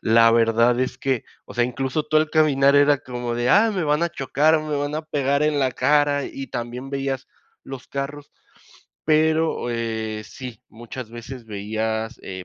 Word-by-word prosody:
la 115 Hz, 0 st, +5 dB
verdad 115 Hz, +1 st, +3 dB
es 130 Hz, 0 st, -1 dB
que, 135 Hz, -3 st, -1 dB, 0.2 s
o -, -, -11 dB
sea, 120 Hz, -, +2 dB
incluso 130 Hz, +4 st, -2 dB
tu 155 Hz, 0 st, +1 dB
al 155 Hz, 0 st, +2 dB
caminar 140 Hz, -3 st, +4 dB
era 145 Hz, 0 st, +5 dB
como 125 Hz, -3 st, -5 dB
de: 120 Hz, +1 st, 0 dB
"Ah, 215 Hz, -, +5 dB
me 185 Hz, -, -1 dB
van 150 Hz, +2 st, +2 dB
a 170 Hz, -, -2 dB
chocar, 155 Hz, +2 st, +2 dB
me 155 Hz, -1 st, -3 dB
van 145 Hz, +1 st, -2 dB
a 155 Hz, -, -2 dB
pegar 140 Hz, -2 st, 0 dB
en 150 Hz, -1 st, +2 dB
la 130 Hz, -2 st, +1 dB
cara", 145 Hz, -1 st, +2 dB
y 135 Hz, -, -6 dB
también 125 Hz, +1 st, -5 dB
veías 135 Hz, -1 st, -3 dB, 0.4 s
los 135 Hz, -1 st, -9 dB
carros, 140 Hz, +1 st, -5 dB, 0.7 s
pero, 155 Hz, -3 st, +2 dB
eh, 110 Hz, -2 st, -3 dB
sí, 125 Hz, -3 st, -9 dB
muchas 120 Hz, +1 st, -9 dB
veces 120 Hz, +1 st, -9 dB
veías, 110 Hz, +2 st, -3 dB
eh, 95 Hz, -1 st, -7 dB
135 Hz, 180 wpm, -23 LUFS, 120-145 Hz, 0.7 s, la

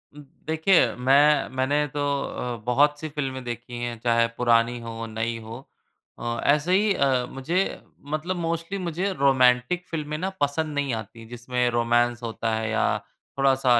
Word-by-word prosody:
उम, 150 Hz, -, -10 dB, 0.2 s
देखिए 160 Hz, -, +3 dB
मैं 140 Hz, +4 st, +4 dB
मैंने 145 Hz, +3 st, +1 dB
तो 145 Hz, 0 st, -4 dB, 0.2 s
अ, 125 Hz, -1 st, -4 dB
बहुत 145 Hz, +4 st, +3 dB
सी 155 Hz, -, -5 dB
फ़िल्में 135 Hz, -3 st, -4 dB
देखी 120 Hz, 0 st, -6 dB
हैं 120 Hz, -1 st, -3 dB
चाहे 115 Hz, 0 st, +2 dB
पुरानी 120 Hz, 0 st, +2 dB
हों, 115 Hz, 0 st, -6 dB
नई 110 Hz, +1 st, -3 dB
हो 115 Hz, +2 st, -8 dB, 0.6 s
अ, 120 Hz, 0 st, -3 dB
ऐसे 150 Hz, +5 st, +2 dB
ही 205 Hz, +1 st, +3 dB
अ, 130 Hz, -5 st, +2 dB
मुझे 165 Hz, +9 st, -1 dB, 0.3 s
मतलब 175 Hz, +4 st, -2 dB
मोस्टली 170 Hz, +3 st, -3 dB
मुझे 180 Hz, +3 st, -2 dB
रोमैन्टिक 135 Hz, +4 st, +3 dB
फ़िल्में 150 Hz, -2 st, -4 dB
ना 185 Hz, +3 st, -2 dB
पसंद 150 Hz, +2 st, 0 dB
नहीं 140 Hz, -3 st, 0 dB
आती, 110 Hz, +1 st, -7 dB
जिसमें 120 Hz, +1 st, -1 dB
रोमैंस 120 Hz, 0 st, +1 dB
होता 115 Hz, 0 st, -2 dB
है 110 Hz, 0 st, -2 dB
या 110 Hz, -1 st, +1 dB, 0.4 s
थोड़ा-सा 130 Hz, -3 st, +4 dB
130 Hz, 155 wpm, -25 LUFS, 120-150 Hz, 0.6 s, मैं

